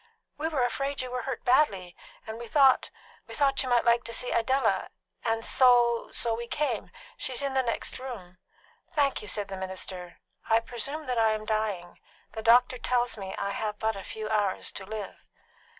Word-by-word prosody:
"We 310 +2 -2
were 295 -6 0
afraid 275 +2 -1
you 250 - -6
were 250 0 -2
hurt 265 -3 -5
badly, 200 -10 +2 0.3
and 220 +1 -6
we 235 - -7
thought 270 +1 +5 0.4
we - - -7
thought 275 -2 +2
you 260 - -3
might 240 -1 +3
like 235 0 +4
to 230 - -5
see 250 - -1
Idella 230 -5 +1 0.3
and 225 -1 0
so 245 -2 +5 0.3
we 235 +1 -6
came. 295 +5 -1 0.3
She 260 - -3
is 250 - +1
in 275 -1 -1
the 265 - +3
next 245 +1 -3
room." 205 -9 -8 0.5
"Thank 285 -2 +1
you," 210 - -9
said 205 -1 -1
the 195 - -6
minister. 185 -1 -6 0.3
"I 225 0 +5
presume 250 +7 -4
that 250 -3 -1
I 220 -1 +4
am 215 0 -4
dying; 210 -5 -2 0.3
the 220 - -6
doctor 245 +3 +5
tells 245 0 +1
me 195 -3 -7
that - - -2
I 200 - -1
have 210 +1 -3
but 220 0 0
a 195 - -6
few 215 +2 -6
hours 210 -3 0
to 190 - -9
live." 210 -2 -7
230 Hz, 200 wpm, -28 LUFS, 210-255 Hz, 0.5 s, thought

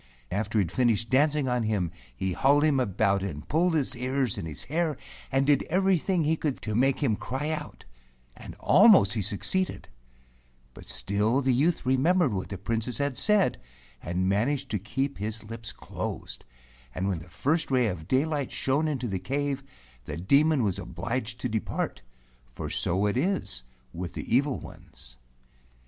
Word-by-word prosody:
After 105 +3 -1
he 105 - +4
had 85 - -5
finished 115 -2 +1
dancing 145 +1 +3
on 125 -1 +1
him, 105 -6 0 0.2
he 95 +7 -2
hauled 140 +8 +4
him 150 -3 +3
about 100 -4 +1
and 80 -6 -5
pulled 165 +2 +2
his 145 -4 +1
ears 130 -2 -1
and 80 - -5
his 75 -3 -3
hair, 155 0 -1 0.3
and 135 0 +2
did 145 -1 +4
everything 185 -1 +2
he 155 +2 +2
could 150 -4 -2
to 110 - -3
make 130 +4 +2
him 115 -6 +2
cry 135 +8 -3
out, 155 - -6 0.5
and - - -10
almost 195 - +6
he 110 - -1
succeeded; 110 - 0 0.9
but - - -13
still 105 +6 0
the 130 -1 +2
youth 155 +6 +1
remembered 140 - +3
what 95 -1 -3
the 100 - -5
Princess 115 +4 -2
had 140 -2 -1
said 205 - +2 0.4
and 90 +2 -1
managed 115 +9 0
to 105 - 0
keep 135 +8 -3
his 110 +2 -4
lips 115 +1 -7
closed, - - -6 0.5
and 95 +2 -1
when 95 -4 -1
the 85 +3 -13
first 160 - 0
ray 130 -2 +3
of 90 -7 -3
daylight 140 +1 0
shone 145 +4 0
into 130 -5 -2
the 95 -3 -2
cave, 140 +6 -2 0.4
the 75 - -5
Demon 140 - +3
was 100 -2 0
obliged 110 +7 -4
to - - 0
depart, 110 - -3 0.5
for - - -6
so 95 +4 0
it 105 +3 0
is 155 - 0 0.3
with 90 0 -5
the - - -2
evil 140 +1 +2
ones. - - -13
125 Hz, 170 wpm, -27 LUFS, 100-145 Hz, 0.9 s, almost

